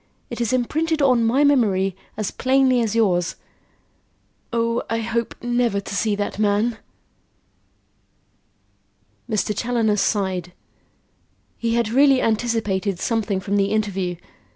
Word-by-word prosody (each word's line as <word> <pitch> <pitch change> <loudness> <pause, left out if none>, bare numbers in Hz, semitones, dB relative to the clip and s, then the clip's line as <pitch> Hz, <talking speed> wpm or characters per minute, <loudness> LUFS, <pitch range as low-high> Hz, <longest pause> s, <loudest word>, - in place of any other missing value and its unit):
It 235 - -4
is 230 - 0
imprinted 310 +6 0
on 250 -4 +4
my 250 +6 +3
memory 200 -10 +2 0.2
as 215 -3 -2
plainly 260 -1 +2
as 225 -1 -1
yours. 180 -6 +1 1.2
Oh, 230 0 0
I 225 - 0
hope 230 0 -2
never 240 -3 +1
to 200 - -7
see 210 0 +1
that 205 0 -4
man!" 215 +2 +1 2.5
Mr. 210 -1 -1
Challoner 225 -2 0
sighed; 190 -3 -1 1.0
he 230 0 -1
had 235 -2 +1
really 270 +2 +4
anticipated 215 -5 -1
something 220 -4 -1
from 200 +1 -1
the 200 - +3
interview. 195 -4 -1
225 Hz, 120 wpm, -22 LUFS, 200-240 Hz, 2.5 s, on